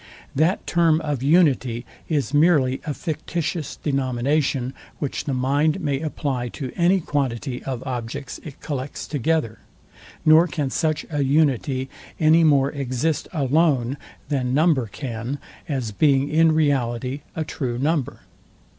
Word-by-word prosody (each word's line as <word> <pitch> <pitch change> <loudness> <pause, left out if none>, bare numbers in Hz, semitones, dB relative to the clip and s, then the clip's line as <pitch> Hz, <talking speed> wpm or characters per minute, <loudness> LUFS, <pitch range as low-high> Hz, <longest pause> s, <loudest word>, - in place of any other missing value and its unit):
That 160 +7 +1
term 165 -2 +3
of 145 -5 -2
unity 135 -6 +3 0.2
is 145 -3 0
merely 145 -4 +3
a 150 - -1
fictitious 160 -1 -3
denomination, 135 -1 0 0.2
which 145 - -3
the 140 - -1
mind 145 +6 +1
may 145 -6 -1
apply 135 -5 -2
to 130 -4 -4
any 180 +3 +3
quantity 130 -5 -2
of 130 -2 -4
objects 125 0 -5
it 145 -4 -10
collects 140 -2 -4
together; 145 -4 -1 0.7
nor 160 +3 +7
can 145 -4 -2
such 155 0 0
an 145 -3 0
unity 135 -2 +1 0.3
any 160 +1 +5
more 140 -3 +4
exist 140 +2 -1
alone 140 -3 +2 0.3
than 130 -3 0
number 150 -6 +3
can, 115 +4 -5 0.3
as 130 -7 -2
being 140 +4 +3
in 160 +1 +4
reality 135 -3 0
a 160 - -1
true 125 -5 -3
number. 145 0 -1
140 Hz, 130 wpm, -23 LUFS, 130-155 Hz, 0.7 s, nor